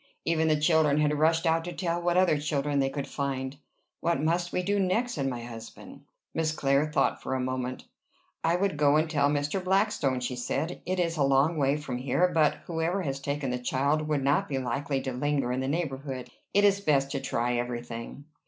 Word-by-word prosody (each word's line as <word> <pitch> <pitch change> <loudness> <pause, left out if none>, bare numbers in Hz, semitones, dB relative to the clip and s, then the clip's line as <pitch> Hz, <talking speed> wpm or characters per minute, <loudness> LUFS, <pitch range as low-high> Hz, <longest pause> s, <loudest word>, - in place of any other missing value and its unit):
Even 160 -1 +2
the 155 -1 +3
children 150 -2 +3
had 150 0 +2
rushed 165 +2 +3
out 165 0 +2
to 175 - -5
tell 175 -1 -2
what 175 0 +1
other 180 -5 +4
children 145 -1 0
they 135 0 +2
could 140 0 -4
find. 135 -1 -3 0.4
"What 170 -4 0
must 170 +3 0
we 180 - -1
do 200 +2 +1
next?" 220 +6 +1
said 140 -4 -1
my 120 -3 -3
husband. 115 -2 -10 0.3
Miss 160 -1 0
Clare 140 -1 +2
thought 150 - +1
for 130 - -2
a - - -1
moment. 130 0 -3 0.6
"I 165 +1 +3
would 190 -3 0
go 145 0 +4
and 155 +1 +3
tell 145 -3 +2
Mr. 145 +6 -1
Blackstone," 185 -9 +1
she 125 0 -3
said. 140 +8 -3
"It 185 0 0
is 170 -2 0
a 145 - +3
long 135 +4 +3
way 140 -1 +2
from 130 -5 -4
here, 135 +8 +2
but 155 -2 +3
whoever 170 +3 -1
has 135 -3 -3
taken 140 -1 -2
the 125 - -2
child 140 +5 0
would 150 -3 0
not 140 +2 +2
be 135 - -1
likely 135 +2 -2
to 130 - -3
linger 135 -1 0
in 125 - -1
the 130 - -2
neighborhood. 135 -4 -3 0.2
It 205 - +3
is 200 -1 +4
best 140 -6 +2
to 140 - -1
try 120 +1 -1
every 120 0 -3
thing." 120 +4 -8
145 Hz, 215 wpm, -28 LUFS, 135-165 Hz, 0.6 s, other